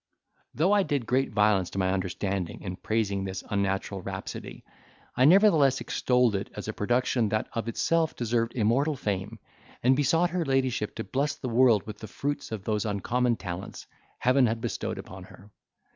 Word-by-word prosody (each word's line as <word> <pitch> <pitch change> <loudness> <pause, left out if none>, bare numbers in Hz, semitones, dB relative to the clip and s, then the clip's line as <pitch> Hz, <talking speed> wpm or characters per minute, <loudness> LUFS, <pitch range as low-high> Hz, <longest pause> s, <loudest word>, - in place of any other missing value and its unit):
Though 170 +7 +2
I 205 -1 +5
did 145 -8 -1
great 130 +4 +1
violence 105 -4 +2
to - - -8
my 95 -1 +1
understanding 95 -1 -3
in 90 -2 -4
praising 100 -1 -1
this 95 -1 -5
unnatural 100 -1 -1
rhapsody, - - -7 0.5
I 130 - +4
nevertheless 160 -6 +5
extolled 125 -3 +1
it 100 +1 -3
as - - -6
a 110 - -3
production 120 +1 +1
that 110 +1 -1
of 115 0 -3
itself 160 +7 +1
deserved 115 -1 -1
immortal 130 +7 +2
fame; 100 -6 -3 0.5
and 130 +2 +5
besought 165 +5 +2
her 180 -1 0
ladyship 130 -6 0
to 110 - -4
bless 140 +5 -1
the 130 - -5
world 115 -3 +4
with 105 -1 -8
the 110 - -8
fruits 145 +6 -4
of 110 -4 -5
those 105 -1 -1
uncommon 120 +4 0
talents 90 -2 -7 0.3
Heaven 130 0 +3
had 115 +1 -1
bestowed - - -3
upon 95 0 -9
her. 100 +2 -16
115 Hz, 175 wpm, -27 LUFS, 100-135 Hz, 0.5 s, I